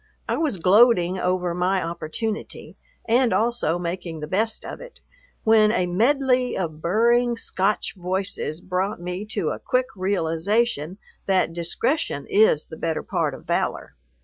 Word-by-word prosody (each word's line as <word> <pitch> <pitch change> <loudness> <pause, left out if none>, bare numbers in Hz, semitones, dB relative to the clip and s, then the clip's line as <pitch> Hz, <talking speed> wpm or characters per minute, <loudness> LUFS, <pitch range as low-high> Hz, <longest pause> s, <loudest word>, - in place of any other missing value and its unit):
I - - 0
was 300 -11 0
gloating 185 -1 +4
over 180 -1 0
my 180 +2 +1
opportunity, 170 +6 -5 0.3
and 240 +1 +3
also 230 -7 +1
making 175 -1 -4
the 150 - -4
best 220 +7 -1
of - - -7
it, - - -12 0.4
when 220 -1 +5
a 185 -5 +1
medley 250 +6 +2
of 160 -4 -4
burring 235 +6 +2
Scotch 200 -1 -1
voices 185 -3 -3
brought 185 +2 -2
me 180 +3 -5
to 205 -7 -2
a - - -4
quick 255 -1 +1
realization 185 0 0 0.3
that 185 -3 +2
discretion 170 - -1
is 205 -7 +4
the 160 - -10
better 165 -1 -2
part - - -1
of - - -14
valor. - - -2
190 Hz, 145 wpm, -23 LUFS, 175-230 Hz, 0.4 s, when